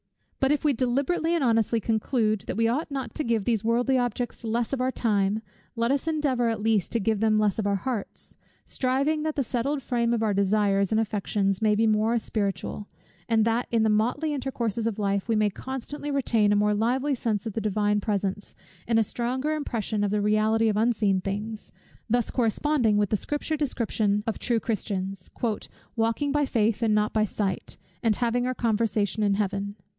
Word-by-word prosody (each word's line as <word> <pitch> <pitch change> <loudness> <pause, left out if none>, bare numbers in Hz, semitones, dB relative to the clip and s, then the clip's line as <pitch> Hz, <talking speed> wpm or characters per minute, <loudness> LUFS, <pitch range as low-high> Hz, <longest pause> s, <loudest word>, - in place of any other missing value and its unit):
But 270 +1 +3
if 295 +1 0
we 295 - +4
deliberately 275 +7 0
and 330 - 0
honestly 225 -1 +2
conclude 220 -1 0
that - - -3
we 230 0 +3
ought 275 +9 -1
not 275 -2 -4
to 305 - -2
give 230 -5 0
these 225 -3 +1
worldly 245 +3 +2
objects 245 0 -3
less 230 +2 -1
of 265 - -1
our 255 +1 +1
time, 210 -2 0 0.3
let 230 +2 +1
us 280 +3 0
endeavour 280 -7 +1
at 220 -2 -3
least 220 -4 +1
to 230 - +2
give 215 0 0
them 220 0 +3
less 210 -1 +1
of 205 - 0
our 200 - +2
hearts: 225 0 -3 0.3
striving 275 +4 0
that 310 0 -2
the 275 - +1
settled 270 +4 -1
frame 235 -2 0
of 230 -1 +1
our 215 -2 +1
desires 200 0 +2
and 220 - +3
affections 200 -2 0
may 215 -1 +3
be 225 +2 +2
more 220 +2 +2
spiritual; 205 -2 -3 0.4
and 220 -1 +3
that 230 +2 +1
in 230 -2 +2
the 220 - +3
motley 245 +9 +1
intercourses 235 -5 -2
of 225 - -2
life 200 0 -1
we 225 - +3
may 210 -1 +2
constantly 265 +6 -6
retain 235 -7 +2
a - - +4
more 210 0 +3
lively 255 +7 +1
sense 225 -5 -1
of 220 - -4
the 225 - -2
Divine 210 0 +1
presence, 200 -1 -2 0.3
and 230 -1 +2
a 225 - +5
stronger 250 +7 -2
impression 225 -8 -2
of 205 - +1
the 210 +1 0
reality 215 +2 +3
of 210 -1 +1
unseen 215 -4 +2
things; 210 +3 -5 0.4
thus 240 0 +1
corresponding 240 -1 +2
with 205 -2 +1
the - - +3
Scripture 295 +8 -2
description 220 -7 0
of 225 - -2
true 235 -2 +1
Christians, 195 -4 -3 0.7
"walking 230 +5 0
by 295 -1 +1
faith 225 -3 +1
and 220 -2 +3
not 210 0 +1
by 215 -1 +3
sight, 195 -3 -3 0.2
and 225 -2 +2
having 245 +1 0
our 255 - -1
conversation 215 -2 0
in 200 -1 +2
Heaven." 200 0 -2
225 Hz, 195 wpm, -26 LUFS, 210-245 Hz, 0.7 s, a